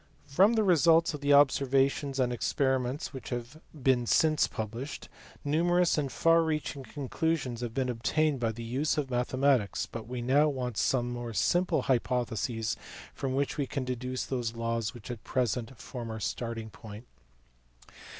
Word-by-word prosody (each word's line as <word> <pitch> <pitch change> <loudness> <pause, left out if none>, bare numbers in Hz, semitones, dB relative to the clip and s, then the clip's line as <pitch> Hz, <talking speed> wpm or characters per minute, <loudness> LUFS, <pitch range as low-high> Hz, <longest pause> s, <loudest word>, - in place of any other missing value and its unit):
From 185 +11 +4
the 220 -2 +2
results 165 -3 +4
of 150 - -6
the 145 0 +3
observations 135 0 +3
and 125 -1 +2
experiments 130 +3 -1
which 130 -4 -7
have 120 +5 -6 0.2
been 125 -2 +3
since 155 +3 +3
published, 115 +6 -6 0.4
numerous 175 +4 +3
and 140 -3 -1
far 165 0 +4
reaching 155 -3 -2
conclusions 135 -2 -2
have 120 -1 -5
been 130 -2 0
obtained 135 +5 0
by 115 -2 0
the 115 +1 -8
use 130 +8 -1
of 140 -3 -2
mathematics, 125 -2 +1
but 115 -2 -8
we 125 0 -4
now 145 +5 +4
want 125 -4 -3
some 120 -2 +1
more 120 -2 -5
simple 175 - +2
hypotheses 120 -3 0 0.4
from 130 -1 -3
which 140 +1 -1
we 140 - 0
can 135 -1 -3
deduce 130 0 -3
those 120 -3 -3
laws 115 -1 -2
which 120 0 -8
at 115 -3 -8
present 125 -1 -1
form 120 -2 -7
our 110 0 -5
starting 115 0 -4
point. 110 +2 -11
130 Hz, 160 wpm, -29 LUFS, 120-145 Hz, 0.4 s, From